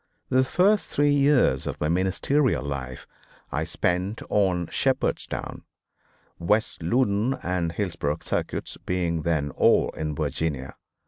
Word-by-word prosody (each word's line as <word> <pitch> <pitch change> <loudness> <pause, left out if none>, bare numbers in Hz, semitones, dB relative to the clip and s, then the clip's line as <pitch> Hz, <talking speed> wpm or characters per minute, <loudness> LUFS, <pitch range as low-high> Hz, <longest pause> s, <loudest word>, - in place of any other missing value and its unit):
The 130 0 +4
first 195 +9 +2
three 145 0 +2
years 140 - +3
of - - -4
my 75 - 0
ministerial 95 - +1
life 65 -3 -5 0.5
I - - -1
spent 90 +4 -1
on 95 -4 +2
Shepherdstown, - - -1 0.8
West 105 +5 0
Loudon 110 +6 +1
and 90 -2 -1
Hillsboro 85 -6 -2
Circuits, - - -3
being 85 -3 0
then 75 -3 0
all - - +3
in 75 -1 -4
Virginia. 70 -3 -2
90 Hz, 120 wpm, -25 LUFS, 80-120 Hz, 0.8 s, The